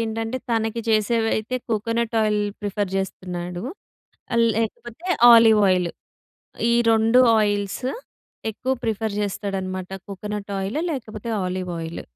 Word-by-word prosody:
ఏంటంటే 225 Hz, +2 st, -2 dB
తనకి 225 Hz, 0 st, 0 dB
చేసేవైతే 225 Hz, +2 st, +1 dB
coconut 230 Hz, +1 st, -1 dB
oil 210 Hz, -1 st, +2 dB, 0.2 s
prefer 205 Hz, -1 st, -2 dB
చేస్తున్నాడు. 180 Hz, -2 st, -4 dB, 0.7 s
ఆహ్, 235 Hz, -, +4 dB
లేకపోతే 230 Hz, +7 st, -4 dB, 0.3 s
ఆలివ్ 225 Hz, -2 st, +7 dB
ఆయిల్. 180 Hz, -2 st, +2 dB, 0.8 s
ఈ -, -, +4 dB, 0.2 s
2 225 Hz, +2 st, +4 dB, 0.2 s
ఆయిల్స్ 205 Hz, +1 st, -1 dB, 0.7 s
ఎక్కువ 250 Hz, +4 st, -3 dB
ప్రిఫర్ 220 Hz, -1 st, -1 dB
చేస్తాడనమాట 190 Hz, -2 st, -3 dB, 0.2 s
కోకోనట్ 205 Hz, +1 st, -5 dB
ఆయిల్ 195 Hz, +9 st, -2 dB
లేకపోతే 225 Hz, -5 st, -6 dB
ఆలివ్ 185 Hz, 0 st, -3 dB
ఆయిల్. 165 Hz, +1 st, -5 dB
215 Hz, 110 wpm, -23 LUFS, 195-225 Hz, 0.8 s, ఆలివ్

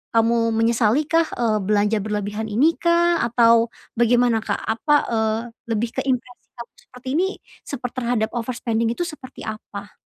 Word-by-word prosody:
kamu 230 Hz, 0 st, +2 dB
menyesali 230 Hz, +4 st, +2 dB
kah, 330 Hz, +1 st, +2 dB
eee, 220 Hz, -3 st, +1 dB
belanja 210 Hz, +2 st, +1 dB
berlebihan 210 Hz, +1 st, -3 dB
ini 285 Hz, +11 st, +3 dB
kah? 340 Hz, 0 st, +3 dB
Atau 230 Hz, -1 st, +4 dB, 0.3 s
bagaimana, 240 Hz, -1 st, +3 dB
Kak? -, -, -2 dB
Apa, 230 Hz, +7 st, -1 dB, 0.2 s
eee, 220 Hz, -1 st, +1 dB, 0.3 s
lebih 225 Hz, +1 st, -1 dB
ke -, -, +1 dB
impresi 250 Hz, -1 st, -3 dB
kamu 235 Hz, -, -9 dB
seperti 250 Hz, +1 st, -16 dB
ini 375 Hz, -, +3 dB, 0.4 s
seper 255 Hz, -3 st, -4 dB
terhadap 235 Hz, -3 st, -1 dB
overspending 230 Hz, -1 st, -1 dB
itu 350 Hz, -, -2 dB
seperti 300 Hz, -6 st, -9 dB
apa? 205 Hz, -1 st, -8 dB
230 Hz, 150 wpm, -22 LUFS, 220-255 Hz, 0.4 s, Atau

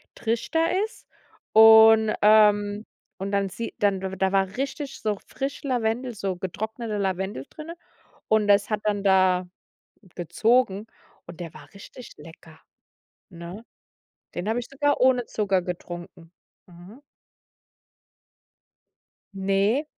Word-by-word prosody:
Trichter 325 Hz, -, 0 dB
ist. 440 Hz, -, -15 dB, 0.5 s
Und, 220 Hz, 0 st, +7 dB
ähm 210 Hz, 0 st, +4 dB, 0.3 s
und 195 Hz, +1 st, -5 dB
dann 200 Hz, -1 st, 0 dB
sieht 230 Hz, +5 st, -6 dB
dann 200 Hz, -2 st, +1 dB
da 190 Hz, 0 st, -1 dB
war 195 Hz, +1 st, 0 dB
richtig 275 Hz, +1 st, -4 dB
so 210 Hz, -2 st, -2 dB
frisch 275 Hz, +2 st, -5 dB
Lavendel, 245 Hz, -1 st, -1 dB
so 195 Hz, -2 st, -3 dB
getrockneter 220 Hz, +4 st, -5 dB
Lavendel 190 Hz, -6 st, -3 dB
drin. 310 Hz, +2 st, -9 dB, 0.6 s
Und 215 Hz, -1 st, +2 dB
das 200 Hz, 0 st, +3 dB
hat 215 Hz, -1 st, -1 dB
dann 205 Hz, -1 st, -1 dB
da 185 Hz, -2 st, +3 dB, 0.7 s
gezogen 215 Hz, +3 st, +1 dB, 0.4 s
und 175 Hz, 0 st, -12 dB
der 165 Hz, -2 st, -7 dB
war -, -, -13 dB
richtig 235 Hz, +5 st, -12 dB
lecker, 160 Hz, +1 st, -15 dB, 0.7 s
ne? 175 Hz, +5 st, -10 dB, 0.7 s
Den 180 Hz, -, -4 dB
habe 225 Hz, +2 st, 0 dB
ich 240 Hz, -, -7 dB
sogar 290 Hz, 0 st, 0 dB
ohne 250 Hz, -1 st, +3 dB
Zucker 195 Hz, -4 st, 0 dB
getrunken. 175 Hz, -1 st, -8 dB, 0.4 s
Mhm. 180 Hz, +8 st, -15 dB, 2.3 s
Ne. 195 Hz, +8 st, +1 dB
205 Hz, 115 wpm, -24 LUFS, 190-230 Hz, 2.3 s, Und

